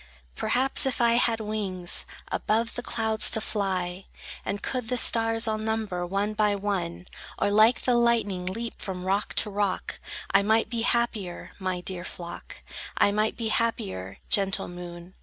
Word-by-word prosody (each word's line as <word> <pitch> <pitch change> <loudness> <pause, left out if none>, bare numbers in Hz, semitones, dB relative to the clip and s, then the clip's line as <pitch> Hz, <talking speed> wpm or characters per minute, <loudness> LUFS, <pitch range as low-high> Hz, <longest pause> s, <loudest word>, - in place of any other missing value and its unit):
Perhaps, 265 - +4
if 265 - -1
I 235 -1 +4
had 235 -1 +3
wings 200 -5 -3 0.2
Above 225 +2 0
the - - -4
clouds 220 -2 +2
to - - +4
fly, 190 -3 -2 0.4
And 205 - -3
could 250 -3 -2
the 250 +1 0
stars 225 -1 +3
all 215 0 0
number, 215 -5 -2
one 200 +3 -1
by 210 -1 +2
one, 190 -4 -2 0.3
Or 205 - +1
like 215 +4 +5
the 250 - +2
lightning 230 -6 +2
leap 230 +5 -4
from 185 -3 -5
rock 195 +2 0
to 210 - +2
rock, 200 -1 -2 0.3
I 195 - +5
might 220 +4 +2
be 235 -1 -1
happier, 225 -6 -1
my 185 -2 -2
dear 180 -1 -4
flock, 175 -1 -8 0.3
I 200 - +4
might 215 +1 0
be 225 -2 -2
happier, 95 - -1
gentle 195 -1 +2
moon! 175 0 -9
210 Hz, 160 wpm, -27 LUFS, 185-225 Hz, 0.4 s, like